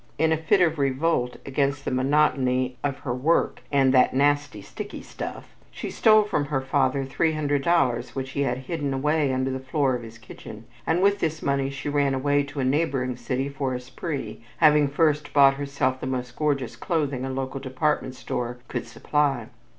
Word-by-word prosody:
In 160 +1 +2
a 160 - +3
fit 180 +5 +2
of 165 -3 +2
revolt 135 -2 0
against 140 +1 -1
the - - -1
monotony 130 -2 +2
of 140 -2 -1
her 125 - -2
work, 140 +7 +1
and 135 -2 +4
"that 130 0 +4
nasty 145 -3 +1
sticky 100 - -8
stuff," - - -8
she - - -6
stole 215 -1 +5
from 180 -9 -1
her 140 -1 -1
father 135 0 0
$300 145 -2 +1
which 130 -1 -4
he 140 - -2
had 125 -3 0
hidden 145 -4 -2
away 150 +1 +1
under 130 0 0
the 130 - -3
floor 135 0 0
of 125 - -5
his 115 0 -11
kitchen, 110 0 -11 0.2
and 170 +3 +2
with 200 0 +3
this 160 -3 -2
money 140 -1 0
she 140 +1 -6
ran 145 -2 +1
away 145 +2 +2
to 145 0 -6
a - - +1
neighboring 130 -3 0
city 125 +2 -2
for 140 -2 -3
a - - -3
spree, 135 +1 -6
having 150 -2 +5
first 150 +1 +1
bought 140 -1 +7
herself 140 -2 -1
the 130 - -4
most 125 -2 -4
gorgeous 140 -6 -1
clothing 145 -1 -1
a 135 - -3
local 130 +1 -3
department 130 0 -1
store 120 -1 -4
could - - -4
supply. 135 -1 0
140 Hz, 185 wpm, -25 LUFS, 130-150 Hz, 0.2 s, bought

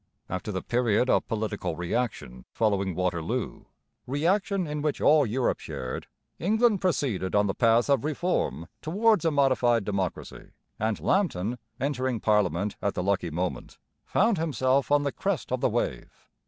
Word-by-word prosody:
After 95 +3 -4
the 95 -2 -3
period 120 0 +2
of - - +2
political 105 -6 -2
reaction 90 - -3
following 100 -5 0
Waterloo, 85 -3 -2 0.4
reaction 180 +7 +1
in 150 -1 -4
which 150 -1 -1
all 150 -3 +5
Europe 120 +4 0
shared, 65 0 -6 0.3
England 215 +2 +2
proceeded 125 - 0
on 105 0 +4
the 95 - 0
path 115 0 +3
of 140 -3 +2
reform 150 - -1
towards 210 +4 +2
a - - +5
modified 130 -6 +2
democracy; 95 -3 -4 0.3
and 110 0 0
Lambton, 125 - 0 0.2
entering 130 -3 -1
parliament 105 -2 +1
at 100 - -1
the 90 - -1
lucky 95 -2 0
moment, 90 +3 -4 0.3
found 215 -1 +2
himself 135 -3 +1
on 145 0 +4
the 140 - 0
crest 195 -4 -2
of 130 -1 -1
the - - +3
wave. 120 +1 -4
120 Hz, 150 wpm, -27 LUFS, 100-150 Hz, 0.4 s, all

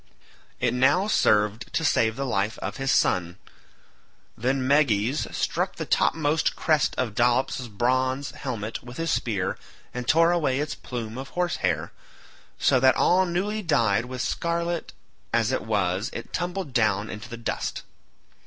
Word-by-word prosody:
It - - +1
now 145 +9 +3
served 105 - +2
to 160 - 0
save 110 -5 +2
the 140 - -3
life 110 -3 -1
of - - -5
his 135 0 0
son. 90 -6 +1 1.0
Then 130 +2 0
Meges 135 -2 +2
struck - - -1
the - - -4
topmost 155 0 +1
crest 155 -3 +1
of 125 -5 -1
Dolops's 120 +2 +1
bronze 130 +5 0
helmet 115 -5 -5
with 120 +1 -11
his 165 -1 -1
spear 100 -11 -1 0.3
and 125 -1 -5
tore 165 +3 +5
away 150 -6 +1
its 150 +1 -2
plume 115 -1 -6
of 135 - -7
horse 175 -2 -1
hair, 85 -3 -1 0.7
so 130 - +3
that 130 +1 +5
all 185 +1 +3
newly 200 +5 -1
dyed 115 - +2
with 125 0 -4
scarlet 170 0 -2 0.4
as 115 +1 +2
it 130 - 0
was 100 0 0
it - - -8
tumbled 180 -4 -3
down 105 -3 +2
into 110 +2 -8
the 120 - -7
dust. 115 - -3
130 Hz, 155 wpm, -25 LUFS, 110-155 Hz, 1.0 s, tore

